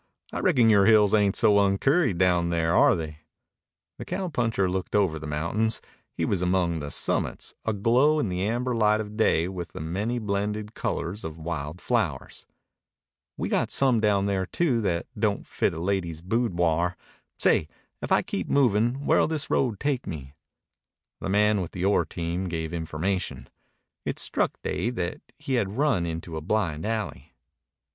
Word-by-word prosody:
I - - -2
reckon 135 - +4
your 100 -1 +5
hills 105 -2 +5
ain't 100 -2 +3
so 105 -3 +4
uncurried 100 - +2
down 90 -2 +2
there, 85 0 +1
are - - +6
they?" 80 -3 -6 0.8
The - - -6
cowpuncher 125 - -1
looked 95 +2 -3
over 95 -7 +2
the 75 - -7
mountains. 85 +10 -1 0.3
He 85 - -2
was 90 +1 0
among 90 -2 +1
the 75 -1 -5
summits, - - -2
aglow 120 +8 +3
in 150 - 0
the 90 -1 -2
amber 120 +3 -1
light 105 -2 +3
of 105 -1 -6
day 90 -6 +2
with 90 -2 -6
the - - -7
many 100 +10 -2
blended 105 0 -2
colors 95 +1 -3
of 80 0 -6
wild 80 0 -5
flowers. - - -2 0.9
"We - - -2
got - - 0
some 130 -4 +3
down 105 -2 +2
there, 95 -2 -1
too, 135 -9 +1
that 85 -5 -1
don't 105 -2 0
fit - - 0
a 80 - -6
lady's 85 -3 -2
boodwar. 90 -5 0 0.4
Say, 75 - +3 0.3
if - - -5
I - - +4
keep - - -4
movin' 125 +1 +2
where'll - - +4
this 155 -2 -3
road 120 -7 +1
take 140 -3 -1
me?" 70 -3 -7 0.9
The - - -4
man 105 0 +3
with 85 - -6
the 90 0 -2
ore 100 - +3
team 85 +2 -3
gave 80 -1 -3
information. 85 +3 -3 0.5
It - - -3
struck - - 0
Dave 120 +2 -2
that 85 -5 -3 0.2
he 135 - -4
had 100 +2 -5
run 130 - +2
into 80 0 -5
a - - -4
blind 85 -2 -1
alley. 100 - -4
100 Hz, 165 wpm, -26 LUFS, 85-110 Hz, 0.9 s, are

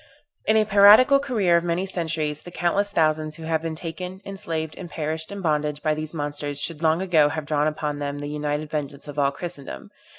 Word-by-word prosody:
In 220 - +4
a 215 - +4
piratical 210 +7 +7
career 215 -11 +2
of 170 - 0
many 175 +2 -1
centuries, 160 -5 -2
the - - -10
countless 185 +4 0
thousands 155 -3 +1
who 165 - -10
have 160 0 0
been 165 -1 -4
taken, 180 +3 -6
enslaved, 165 -5 -4
and 175 - -8
perished 160 +1 -4
in 200 -1 -6
bondage 150 -3 -1
by 155 - +2
these 155 0 -5
monsters 145 -2 -3
should 155 +1 -2
long 160 +2 +2
ago 160 -6 +4
have 155 0 -4
drawn 150 0 +1
upon 150 -1 -3
them 145 0 -3
the 145 - -5
united 150 0 -3
vengeance 145 -1 -4
of 145 0 -5
all 140 -1 +3
Christendom. 145 -1 -8
160 Hz, 205 wpm, -24 LUFS, 150-175 Hz, -, piratical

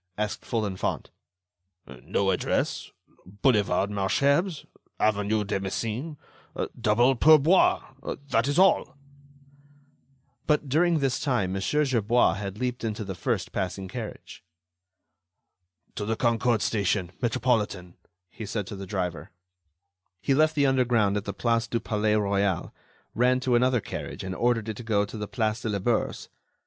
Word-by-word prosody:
asked 105 0 -2
Folenfant. 105 -5 -2 0.9
"No - - 0
address. - - -1 0.3
'Boulevard 100 -1 +1
Malesherbes... 140 - +1 0.3
avenue 105 0 +1
de 100 -1 -2
Messine... 115 - -4 0.6
double 120 +4 +3
pourboire.' 155 +1 +4 0.3
That 115 +1 +2
is 145 - 0
all." 190 -5 +3 1.5
But, 150 -1 +2
during 165 +5 +3
this 135 -3 0
time, 120 -10 0
Mon. 95 - -2
Gerbois 125 -3 +2
had 100 0 -5
leaped 125 0 -3
into 110 -1 -3
the 95 -1 -5
first 90 - -2
passing 95 +1 -3
carriage. 115 +1 -8 1.5
"To 105 - -4
the 110 +1 0
Concorde 115 -1 +1
station, 100 -4 0
Metropolitan," 115 -7 0 0.4
he 110 +1 -8
said 105 -1 -3
to 100 - -7
the 95 0 -8
driver. 90 -6 -3 0.9
He 135 - +1
left 155 +3 +3
the 145 -2 +3
underground 120 -6 +2
at 105 0 -2
the - - -3
Place 115 -1 0
du 115 - -1
Palais 105 -1 0
Royal, 100 -3 0 0.4
ran 125 +2 +3
to 130 -1 0
another 125 0 +3
carriage - - -6
and 95 0 -4
ordered 115 +1 0
it 110 -2 -4
to - - -7
go 105 -2 +1
to 100 - -10
the 105 -1 -4
Place 110 -2 -1
de 115 - -3
la 105 - 0
Bourse. 110 +4 -1
110 Hz, 140 wpm, -26 LUFS, 100-125 Hz, 1.5 s, pourboire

